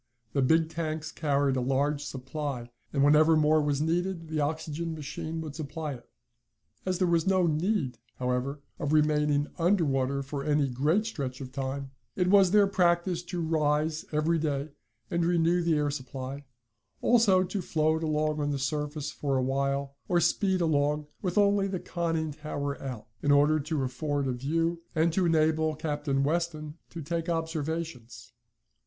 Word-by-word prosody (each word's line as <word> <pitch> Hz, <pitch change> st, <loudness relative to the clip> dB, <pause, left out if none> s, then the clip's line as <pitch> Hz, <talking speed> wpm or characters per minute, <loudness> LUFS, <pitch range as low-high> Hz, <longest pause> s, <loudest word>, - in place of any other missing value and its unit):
The 140 Hz, -, +2 dB
big 160 Hz, +5 st, +4 dB
tanks 160 Hz, -1 st, -3 dB
carried 140 Hz, -4 st, +1 dB
a 130 Hz, -, 0 dB
large 140 Hz, +3 st, 0 dB
supply, 135 Hz, -2 st, -5 dB, 0.2 s
and 140 Hz, -1 st, +2 dB
whenever 155 Hz, +2 st, +6 dB
more 155 Hz, 0 st, +4 dB
was 145 Hz, 0 st, 0 dB
needed 170 Hz, 0 st, -1 dB
the 155 Hz, -1 st, -1 dB
oxygen 160 Hz, +2 st, -2 dB
machine 160 Hz, +2 st, -5 dB
would 155 Hz, -3 st, -7 dB
supply 155 Hz, 0 st, -4 dB
it. 120 Hz, -2 st, -13 dB, 0.8 s
As 185 Hz, -1 st, +1 dB
there 185 Hz, 0 st, +2 dB
was 170 Hz, 0 st, +2 dB
no 190 Hz, -2 st, +3 dB
need, 155 Hz, -, 0 dB, 0.2 s
however, 125 Hz, +3 st, -2 dB, 0.2 s
of 145 Hz, -, -1 dB
remaining 150 Hz, -1 st, +2 dB
under 175 Hz, +1 st, +3 dB
water 135 Hz, 0 st, 0 dB
for 140 Hz, 0 st, -5 dB
any 145 Hz, -2 st, +2 dB
great 150 Hz, -, +1 dB
stretch 135 Hz, -, -4 dB
of 130 Hz, -2 st, -7 dB
time, 135 Hz, 0 st, -4 dB, 0.2 s
it 180 Hz, -1 st, +1 dB
was 195 Hz, -2 st, +6 dB
their 205 Hz, +1 st, +5 dB
practice 175 Hz, -2 st, +2 dB
to 175 Hz, -1 st, -3 dB
rise 155 Hz, 0 st, +1 dB
every 160 Hz, +2 st, +1 dB
day 145 Hz, -1 st, -1 dB, 0.4 s
and 170 Hz, -1 st, +1 dB
renew 170 Hz, 0 st, +2 dB
the 170 Hz, -2 st, +2 dB
air 150 Hz, -1 st, +1 dB
supply, 135 Hz, 0 st, -6 dB, 0.6 s
also 210 Hz, -6 st, +5 dB
to 190 Hz, +2 st, -3 dB
float 160 Hz, -1 st, +1 dB
along 155 Hz, -1 st, 0 dB
on 145 Hz, 0 st, 0 dB
the 145 Hz, -, -1 dB
surface 150 Hz, +2 st, -2 dB
for 140 Hz, -2 st, -1 dB
a 130 Hz, -, +1 dB
while, 140 Hz, +1 st, -1 dB
or 175 Hz, -, +3 dB
speed 185 Hz, +3 st, +2 dB
along, 150 Hz, -2 st, +1 dB, 0.2 s
with 180 Hz, -2 st, -2 dB
only 200 Hz, -1 st, +4 dB
the 190 Hz, -2 st, -3 dB
conning 165 Hz, -3 st, -2 dB
tower 145 Hz, -1 st, -4 dB
out, 125 Hz, -5 st, -6 dB, 0.2 s
in 145 Hz, -, 0 dB
order 145 Hz, +2 st, +5 dB
to 150 Hz, -1 st, -2 dB
afford 140 Hz, +3 st, -2 dB
a -, -, 0 dB
view, 165 Hz, +7 st, -1 dB
and 160 Hz, +1 st, +2 dB
to 180 Hz, 0 st, +2 dB
enable 160 Hz, -1 st, +2 dB
Captain 145 Hz, -3 st, -1 dB
Weston 155 Hz, 0 st, -2 dB
to 165 Hz, -2 st, -7 dB
take 165 Hz, +3 st, -2 dB
observations. 160 Hz, -5 st, -4 dB
155 Hz, 165 wpm, -28 LUFS, 140-165 Hz, 0.8 s, whenever